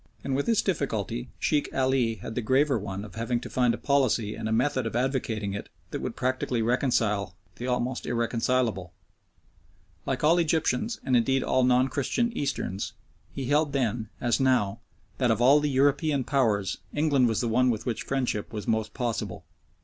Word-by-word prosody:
And 135 Hz, -, -1 dB
with 140 Hz, -, -1 dB
this 230 Hz, -3 st, +3 dB
difficulty 120 Hz, -, -2 dB
Sheikh 150 Hz, -2 st, 0 dB
Ali 130 Hz, -3 st, +2 dB
had 110 Hz, -, -7 dB
the 125 Hz, -, -2 dB
graver 135 Hz, +2 st, +2 dB
one 100 Hz, 0 st, -5 dB
of 105 Hz, -, -12 dB
having 115 Hz, +3 st, -1 dB
to -, -, -8 dB
find 125 Hz, -2 st, +2 dB
a -, -, -9 dB
policy 125 Hz, -6 st, +1 dB
and 110 Hz, 0 st, -4 dB
a -, -, -2 dB
method 130 Hz, +1 st, +1 dB
of 115 Hz, -, -5 dB
advocating 120 Hz, -5 st, -1 dB
it 100 Hz, -, -6 dB, 0.2 s
that -, -, -4 dB
would -, -, -4 dB
practically 125 Hz, -2 st, -1 dB
reconcile 110 Hz, -6 st, +1 dB, 0.2 s
the 125 Hz, -, -5 dB
almost 125 Hz, 0 st, -1 dB
irreconcilable. 115 Hz, -5 st, 0 dB, 1.1 s
Like 135 Hz, +1 st, -1 dB
all 165 Hz, +3 st, +5 dB
Egyptians, 160 Hz, -, 0 dB
and 130 Hz, -, +1 dB
indeed 135 Hz, +3 st, +2 dB
all 130 Hz, -, +2 dB
non 125 Hz, +1 st, +4 dB
Christian 230 Hz, -, -1 dB
Easterns, 100 Hz, -8 st, -2 dB, 0.4 s
he 135 Hz, -, -5 dB
held 145 Hz, +2 st, +2 dB
then, 115 Hz, -5 st, -1 dB
as 120 Hz, +2 st, +1 dB
now, 125 Hz, -7 st, +2 dB, 0.4 s
that -, -, +2 dB
of -, -, +2 dB
all 135 Hz, +5 st, +6 dB
the 150 Hz, 0 st, 0 dB
European 140 Hz, +1 st, +2 dB
Powers 110 Hz, -8 st, +1 dB, 0.2 s
England 145 Hz, -4 st, +3 dB
was 115 Hz, -2 st, 0 dB
the 120 Hz, -, 0 dB
one 125 Hz, +3 st, +3 dB
with 115 Hz, -1 st, -2 dB
which 120 Hz, -3 st, -2 dB
friendship 125 Hz, -6 st, -2 dB
was 105 Hz, -3 st, -6 dB
most 110 Hz, -1 st, -1 dB
possible. 115 Hz, -7 st, -3 dB
125 Hz, 180 wpm, -27 LUFS, 110-135 Hz, 1.1 s, all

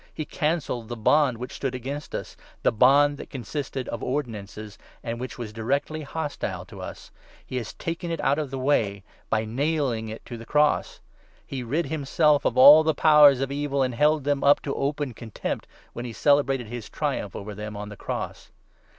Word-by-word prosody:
He 155 Hz, -, -5 dB
cancelled 150 Hz, -9 st, -2 dB
the 120 Hz, -, -5 dB
bond 130 Hz, +2 st, +3 dB
which 125 Hz, +2 st, -6 dB
14 -, -, -9 dB
stood 135 Hz, -2 st, -2 dB
against 135 Hz, +4 st, -5 dB
us -, -, -6 dB
— -, -, -29 dB
the -, -, +4 dB
bond 140 Hz, +5 st, +4 dB
that -, -, -8 dB
consisted 135 Hz, 0 st, -5 dB
of 120 Hz, -, -4 dB
ordinances— 110 Hz, -6 st, -5 dB, 0.2 s
and 115 Hz, 0 st, -4 dB
which 130 Hz, +1 st, -6 dB
was 115 Hz, -3 st, -6 dB
directly 140 Hz, +8 st, -1 dB
hostile 150 Hz, 0 st, -4 dB
to -, -, -11 dB
us! -, -, -9 dB, 0.3 s
He 130 Hz, -, -5 dB
has 115 Hz, -4 st, -5 dB
taken 170 Hz, +1 st, -4 dB
it 165 Hz, -1 st, -2 dB
out 140 Hz, +3 st, +2 dB
of 145 Hz, -4 st, -3 dB
our 135 Hz, -, -4 dB
way 105 Hz, -8 st, +1 dB, 0.3 s
by 110 Hz, 0 st, +1 dB
nailing 130 Hz, -2 st, -1 dB
it 110 Hz, -, -8 dB
to 120 Hz, -, -7 dB
the -, -, -8 dB
cross! 150 Hz, 0 st, +1 dB, 0.4 s
He 135 Hz, -2 st, -5 dB
rid 145 Hz, +8 st, -1 dB
himself 150 Hz, 0 st, +2 dB
of -, -, +1 dB
all 145 Hz, +4 st, +10 dB
the 160 Hz, -1 st, +1 dB
15 -, -, -16 dB
Powers 150 Hz, -4 st, +7 dB
of 135 Hz, 0 st, -2 dB
Evil, 140 Hz, -1 st, 0 dB
and 130 Hz, -1 st, -1 dB
held 150 Hz, +4 st, +3 dB
them 145 Hz, 0 st, 0 dB
up 145 Hz, +1 st, +6 dB
to 140 Hz, -, -2 dB
open 140 Hz, -1 st, -2 dB
contempt, 110 Hz, -1 st, -5 dB, 0.3 s
when 120 Hz, -, -5 dB
he 120 Hz, -, -6 dB
celebrated 135 Hz, -2 st, +2 dB
his 115 Hz, -1 st, -7 dB
triumph -, -, -3 dB
over 105 Hz, +1 st, -6 dB
them 105 Hz, +1 st, -7 dB
on 105 Hz, 0 st, -6 dB
the 105 Hz, -, -9 dB
cross -, -, -5 dB
135 Hz, 200 wpm, -25 LUFS, 115-145 Hz, 0.4 s, all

